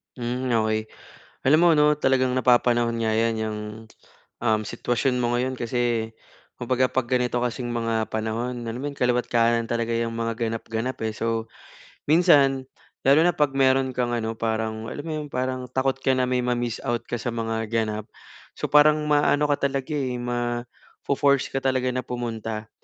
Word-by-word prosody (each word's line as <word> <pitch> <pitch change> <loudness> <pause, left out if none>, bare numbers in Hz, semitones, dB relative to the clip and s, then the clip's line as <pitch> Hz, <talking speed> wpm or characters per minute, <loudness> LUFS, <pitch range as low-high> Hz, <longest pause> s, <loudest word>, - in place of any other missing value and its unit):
Hmm, 125 +1 -3 0.2
okey. 110 0 -1 0.6
Alam 155 - +6
mo 175 +1 +5
'no, 150 0 +4
talagang 130 -2 +2
napapanahon 120 -2 +3
nga 110 - +1
'yan 115 +1 +1
'yang, 110 -1 -3 0.8
um, 110 -2 +2
sitwasyon 125 +2 -1
mo 120 0 +1
ngayon 130 +1 -1
kasi, 120 -2 -1 0.5
kumbaga 130 +1 +1
'pag 130 -2 0
ganito 125 0 0
kasing 120 0 -2
mga 115 -2 -1
panahon 115 +3 -3
alam 115 +2 -4
mo - - -4
'yon 140 - -11
kaliwa't 125 0 +1
kanan 115 -1 +2
talaga 115 0 -1
'yong 115 0 -1
mga 115 0 -1
ganap-ganap 115 +2 -3
eh. 110 - -2
So, 115 +1 -2 0.6
minsan 140 -5 +4 0.4
lalo 140 +3 +6
na 175 - +2
'pag 150 -2 +2
meron 130 0 +3
kang 120 -1 -1
ano 115 -1 -3
parang, 110 0 -2
alam 145 - -6
mo 160 +1 -5
'yon 150 - -5
parang 130 0 -2
takot 130 +1 0
ka 135 0 +1
na 130 0 +1
may 125 0 +2
ma-miss 120 -1 -1
out 120 -1 0
ka 120 - -4
sa 120 - -4
mga 115 -1 -2
ganap. 110 -1 -1 0.5
So - - -4
parang 150 +1 +5
ma-aano 145 0 +3
ka 140 -1 +2
talaga 135 +2 -4
eh, 135 -4 -1
mafo-force 120 +3 -1
ka 135 - 0
talaga 130 -1 +1
na 130 - -1
pumunta. 110 -2 -4
120 Hz, 170 wpm, -24 LUFS, 115-130 Hz, 0.8 s, Alam